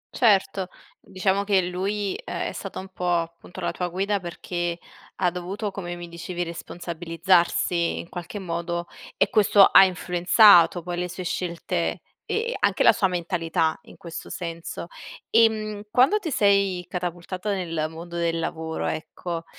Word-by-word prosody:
Certo, 195 -4 +3 0.3
diciamo 190 +1 0
che 200 -2 +3
lui 195 +3 -2
è - - -3
stata - - -7
un 190 - -7
po' 180 -1 -3
appunto 170 +2 -10
la 175 - -1
tua 180 - -3
guida, 195 +3 -1
perché 175 -1 -4 0.4
ha 180 -2 +1
dovuto, 195 +4 -4
come 175 -3 -5
mi 175 0 -8
dicevi, 175 +1 -5
responsabilizzarsi 170 +1 0
in 170 - -7
qualche 175 +4 -7
modo 170 -1 -3 0.3
e - - +2
questo 205 -3 +6
ha - - +8
influenzato 180 0 +5
poi 175 0 -4
le 180 0 -2
sue 185 - -6
scelte 170 -1 -2 0.3
e 470 +2 -1
anche - - +2
la - - +8
sua 195 - +2
mentalità 170 -3 0
in - - -15
questo 170 -1 -8
senso. 170 -2 -6 0.5
Ehm, 215 -2 +3
quando 260 - +4
ti 350 - -4
sei 200 - +2
catapultata 180 +3 -4
nel 165 -5 -2
mondo 170 +2 -9
del 170 -1 0
lavoro, 160 0 -3
ecco, 165 +1 -4
180 Hz, 145 wpm, -25 LUFS, 170-195 Hz, 0.5 s, ha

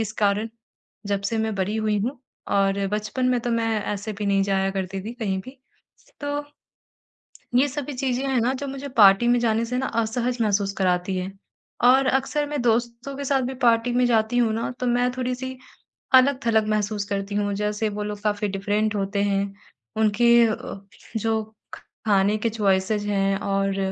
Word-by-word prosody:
इस 215 -1 -2
कारण 205 +3 +1 0.6
जब 200 -1 0
से 220 +3 -1
मैं 220 -1 -1
बड़ी 195 +3 -1
हुई 215 -1 0
हूँ 250 +6 -3 0.3
और 195 0 +1
बचपन 215 +5 -1
में 250 - +2
तो 240 - -3
मैं 230 -1 +1 0.3
ऐसे 205 +2 -5
भी 210 - -2
नहीं 195 -1 +3
जाया 195 -1 +1
करती 190 0 -3
थी 225 - -5
कहीं 200 -5 -2
भी। 260 +1 -12 0.6
तो 290 0 -2 1.1
ये 255 +3 +5
सभी 290 +1 -5
चीज़ें 260 0 -1
हैं 260 -3 +1
ना, 245 +3 +1
जो 280 +2 -4
मुझे 275 +1 -6
पार्टी 200 +2 +7
में 245 - +4
जाने 230 -1 +1
से 250 +2 -3
ना 265 - -1
असहज 240 +2 -1
महसूस 200 -2 +1
कराती 180 0 +1
हैं। 190 +2 -5 0.5
और 265 +1 +5
अक्सर 270 +3 +1
मैं 295 -1 -3
दोस्तों 235 +3 0
के 280 - -5
साथ 270 -1 +1
भी 260 +2 -3
पार्टी 235 0 +3
में 250 +1 +3
जाती 225 0 +2
हूँ 230 -2 +3
ना? 230 +2 -2
तो 250 - -1
मैं 245 +1 +2
थोड़ी-सी 255 +1 -3 0.6
अलग-थलग 255 -5 +4
महसूस 210 -1 0
करती 200 0 -3
हूँ 205 0 0
जैसे 210 +1 -1
वो 210 0 -4
लोग 210 0 -5
काफ़ी 205 -1 0
डिफ़रेंट 205 +2 -1
होते 200 0 -1
हैं 200 0 0 0.4
उनके 235 +2 +5
अ, 215 -2 -4 0.4
जो 220 0 0 0.6
खाने 200 0 +3
के 230 +2 0
चॉइसेस 205 -1 +1
हैं 195 -1 +1
और 195 0 -1
220 Hz, 180 wpm, -24 LUFS, 200-245 Hz, 1.1 s, पार्टी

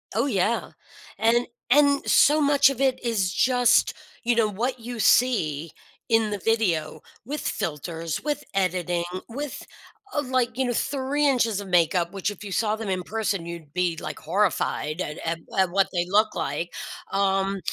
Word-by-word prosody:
Oh, 230 +4 +2
yeah. 225 -3 0 0.5
And 235 +2 +2 0.2
and 280 +1 +4
so 300 +2 +5
much 285 -2 +5
of 275 -3 -5
it 265 -2 +1
is 205 -6 0
just, 245 0 +3 0.3
you 240 0 +2
know, 230 -2 +3
what 240 +6 -2
you 235 0 -7
see 165 - +2 0.4
in 225 -2 +2
the 205 - -2
video 185 -8 0 0.2
with 295 +5 -4
filters, 165 +1 -3
with 295 -1 -2
editing, 180 -2 0 0.2
with, 280 +4 -6 0.5
uh, 295 - +2
like, 250 -3 0
you 265 - +2
know, 245 - 0
3 285 +4 0
inches 230 -6 +2
of 200 - -7
makeup, 175 0 +2
which 195 +1 -2
if 205 - -12
you 195 - -5
saw 215 +1 +1
them 220 -1 -5
in 185 -1 -1
person, 205 -4 -2
you'd 170 -4 -9
be, 180 -2 0
like, 155 - -6
horrified 165 -2 0
at 150 -4 -4
at 165 0 -1 0.2
at 190 -1 +3
what 195 +1 +3
they 175 -1 0
look 210 +4 +3
like. 170 +1 -3 0.4
Um, 195 0 +1
210 Hz, 170 wpm, -25 LUFS, 180-245 Hz, 0.5 s, so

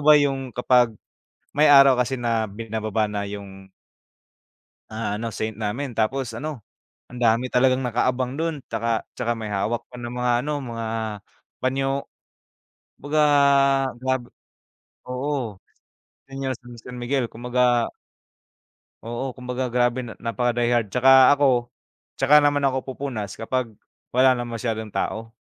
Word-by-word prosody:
ba 150 0 +8
yung 135 -3 -1
kapag 125 -1 +3 0.6
may 155 +1 +5
araw 135 -2 +8
kasi 125 +2 0
na 115 -2 +1
binababa 110 0 -2
na 100 -1 -3
yung 100 -1 -9 1.2
ah, 110 -2 -3
ano 115 +1 -4
saint 110 -1 -4
namin. 120 +5 -3
Tapos 125 +3 0
ano 150 -3 -5 0.5
ang 125 - -10
dami 115 +2 +3
talagang 130 +1 +3
naka-abang 125 +2 0
do'n 165 -1 -1
'tsaka, 115 -1 -1
'tsaka 120 -1 -2
may 110 -1 -5
hawak 110 +4 -1
pa 125 - -12
na 120 0 -6
mga 125 0 0
ano, 150 - -2 0.2
mga 115 -1 -4 0.8
panyo. 135 +1 0 1.1
Kumbaga 150 +2 -1 0.8
grab 130 -1 0 0.9
oo 125 -5 -3 0.7
Senior 135 -1 -3
San 120 0 -11
Miguel, 120 0 0
kumbaga 120 0 +1 1.2
oo 120 +3 -4
kumbaga 125 0 -3
grabe 125 +1 +1 0.2
napaka 120 +1 0
die 120 0 +1
hard. 115 -3 +2
'Tsaka 130 +2 +7
ako 130 -4 +2 0.5
'tsaka 145 +3 +6
naman 145 -1 +2
ako 130 -1 +1
pupunas 120 -8 -5
kapag 120 0 -2 0.4
wala 130 +1 +6
na 120 -1 -1
masyadong 115 -1 -3
tao, 115 +1 -3
125 Hz, 130 wpm, -23 LUFS, 115-130 Hz, 1.2 s, ba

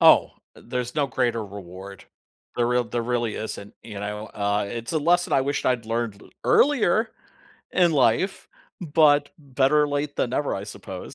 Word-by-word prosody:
Oh, - - +6 0.2
there's 125 +1 -5
no 145 -2 +1
greater 120 -4 0
reward. 95 0 -10 0.5
There 120 -1 +2
real 125 0 +2
there 120 0 -3
really 120 -2 -1
isn't, 105 -2 -6
you 105 -3 -8
know, 105 +1 -4
uh, 100 0 -1
it's 115 +5 -5
a 160 - +2
lesson 175 +4 +2
I 135 - +4
wished 140 +2 -1
I'd 125 -3 +1
learned 115 -3 -2 0.2
earlier 230 -6 +3 0.6
in 175 -3 +4
life, 140 - +1 0.3
but 150 -3 +4
better 140 +1 +2
late 145 0 -2
than 120 - 0
never, 145 +2 -1
I 100 - -4
suppose. 105 - -8
125 Hz, 160 wpm, -24 LUFS, 110-145 Hz, 0.6 s, Oh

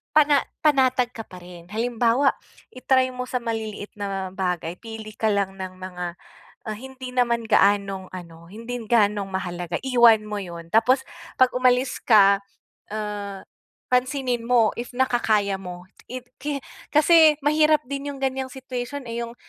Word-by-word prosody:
pana 295 -2 +5 0.2
panatag 260 -4 +3
ka 225 - -6
pa 180 - -12
rin. 175 -1 -12
Halimbawa 235 +4 +2 0.4
i-try 255 0 +2
mo 250 0 -5
sa 250 - -1
maliliit 220 -3 -4
na 195 -2 -3
bagay, 180 -2 -3
pili 220 -1 -9
ka 220 - 0
lang 195 -1 -1
ng 185 -1 -5
mga, 180 -1 -6 0.6
ah, 215 - -3
hindi 260 +2 -9
naman 235 -2 +2
gaanong 200 -3 +2
ano, 170 -2 -10
hindi 230 +4 -6
gaanong 210 -3 +2
mahalaga 175 -2 -3
iwan 235 -4 +5
mo 210 -1 -4
'yun 170 -3 -8
tapos 250 +4 +4 0.3
'pag 255 -1 +5
umalis 255 +1 +2
ka, 200 -3 +6 0.5
ah, 205 -2 -5 0.5
pansinin 250 -2 0
mo 235 -3 +4
if 240 +1 -6
nakakaya 220 -6 +1
mo. 180 -2 -8 0.2
It 255 0 -7
ki 280 0 -4 0.3
kasi 315 0 +6
mahirap 305 +1 +3
din 280 +1 -4
'yung 275 - -11
ganiyang 265 0 -1
situation, 260 +1 -5
eh, 230 0 -4
'yung 235 - -9
230 Hz, 150 wpm, -24 LUFS, 200-255 Hz, 0.6 s, ka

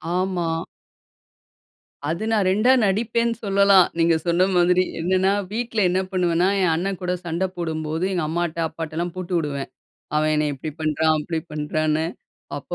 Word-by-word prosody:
ஆமா. 185 -2 0 1.6
அது 170 +6 -2
நான் 210 -4 +2
ரெண்டா 215 +7 +4
நடிப்பேன்னு 230 +3 +1
சொல்லலாம். 200 -2 +5
நீங்க 165 0 +4
சொன்ன 175 +2 +3
மாதிரி. 180 +1 +4 0.2
என்னன்னா, 185 +3 +2 0.2
வீட்ல 230 0 -2
என்ன 185 - +1
பண்ணுவேன்னா, 180 -1 +2
என் 180 -3 +3
அண்ணன் 190 +3 -2
கூட 180 0 -1
சண்டை 170 +2 -1
போடும்போது, 160 0 -3
எங்க 175 -3 0
அம்மாட்ட 170 0 -2
அப்பாட்டலாம் 165 +2 -4
போட்டு 185 0 -5
விடுவேன். 145 -4 -3 0.5
அவன் 155 0 +2
என்னைய 150 -1 0
இப்பிடி 150 +3 -6
பண்றான், 155 0 +2
அப்பிடி 160 +2 -3
பண்றான்னு. 155 +1 0 0.5
அப்ப - - -7
175 Hz, 140 wpm, -23 LUFS, 160-190 Hz, 1.6 s, சொல்லலாம்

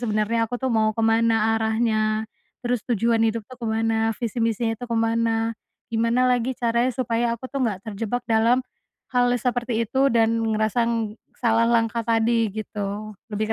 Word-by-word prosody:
sebenarnya 225 0 0
aku 245 - -3
tuh 260 -1 -2
mau 220 -1 +2
ke 225 - 0
mana 225 -1 +3
arahnya, 220 -1 +1 0.4
terus 240 -2 0
tujuan 230 0 +2
hidup 220 -1 -3
tuh 250 +2 -14
ke 230 - -3
mana 225 0 0
visi 235 0 -3
misinya 225 0 0
tuh 245 - -6
ke 230 - -1
mana, 225 0 +1 0.4
gimana 230 +3 +2
lagi 250 0 +1
caranya 235 +1 +1
supaya 235 -1 0
aku 260 +3 -10
tuh 275 - -2
nggak 210 -5 -1
terjebak 225 +3 -3
dalam, 230 +3 +2 0.5
hal 245 0 +3
seperti 240 -1 -1
itu 265 +5 +2
dan 230 -1 +2 0.2
ngerasa 225 +2 +1 0.5
salah 230 -1 +2
langkah 230 0 +2
tadi 230 0 +2
gitu 210 0 -5 0.2
lebih 215 +1 -1
230 Hz, 165 wpm, -23 LUFS, 220-235 Hz, 0.5 s, mana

